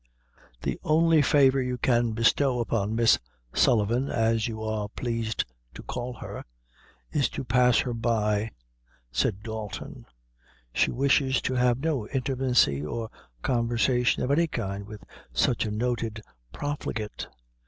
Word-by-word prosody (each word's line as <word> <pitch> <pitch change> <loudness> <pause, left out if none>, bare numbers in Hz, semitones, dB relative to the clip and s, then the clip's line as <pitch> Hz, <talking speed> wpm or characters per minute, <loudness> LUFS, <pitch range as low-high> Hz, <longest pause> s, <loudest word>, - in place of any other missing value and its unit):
"The - - -2
only 160 0 +4
favor 135 -1 +4
you 125 -1 -2
can 120 -2 +2
bestow 125 +3 +2
upon 110 -2 -1
Miss 115 -1 +4 0.3
Sullivan, 120 +3 +2
as 115 -1 +1
you 110 -1 -5
are 110 -1 -2
plaised 115 -1 -2 0.3
to - - -9
call 125 0 -4
her, - - -8 0.7
is 140 -4 +1
to - - -5
pass 125 0 +4
her 125 - -3
by," 110 -2 0 0.6
said 95 +10 0
Dalton; 110 -3 -7 0.7
"she - - +3
wishes 135 0 +2
to 130 - -1
have 125 0 +2
no 145 -10 0
intimacy 130 - +1
nor 110 +10 -4 0.3
conversation 120 0 +1
of 125 - 0
any 165 +4 +3
kind 100 -7 -4
with 105 -1 -10 0.3
such 115 - +2
a - - -3
noted 115 -1 -2 0.3
profligate. 115 - -4
120 Hz, 130 wpm, -27 LUFS, 110-130 Hz, 0.7 s, only